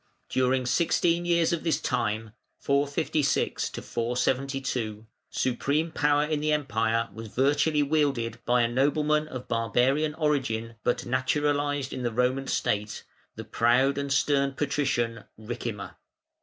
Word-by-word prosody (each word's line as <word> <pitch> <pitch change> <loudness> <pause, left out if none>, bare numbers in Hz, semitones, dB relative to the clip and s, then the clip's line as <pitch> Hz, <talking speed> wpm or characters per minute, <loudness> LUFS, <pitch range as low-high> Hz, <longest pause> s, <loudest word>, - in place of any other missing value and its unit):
During 130 0 +1
sixteen 170 +4 +2
years 170 -1 +2
of 170 - -2
this 165 - +1
time 110 -3 -1 0.3
(456 145 +1 0
472), 125 -2 -2 0.2
supreme 145 +6 0
power 145 -1 +2
in 150 0 -1
the 155 +1 0
Empire 115 -6 0
was 110 0 -8
virtually 145 +5 +2
wielded 140 -6 0
by 120 0 +3
a - - +3
nobleman 150 +5 +1
of 130 -4 -7
barbarian 125 +7 +1
origin, 130 -8 -1
but 120 - 0
naturalised 145 +2 0
in - - -4
the 120 -1 -1
Roman 125 +3 0
State, 105 +1 -1 0.3
the - - -7
proud 130 +4 +2
and 140 -1 -3
stern 140 0 +2
"Patrician" 130 -6 -1
Ricimer. 110 -2 -5
135 Hz, 125 wpm, -27 LUFS, 120-150 Hz, 0.3 s, by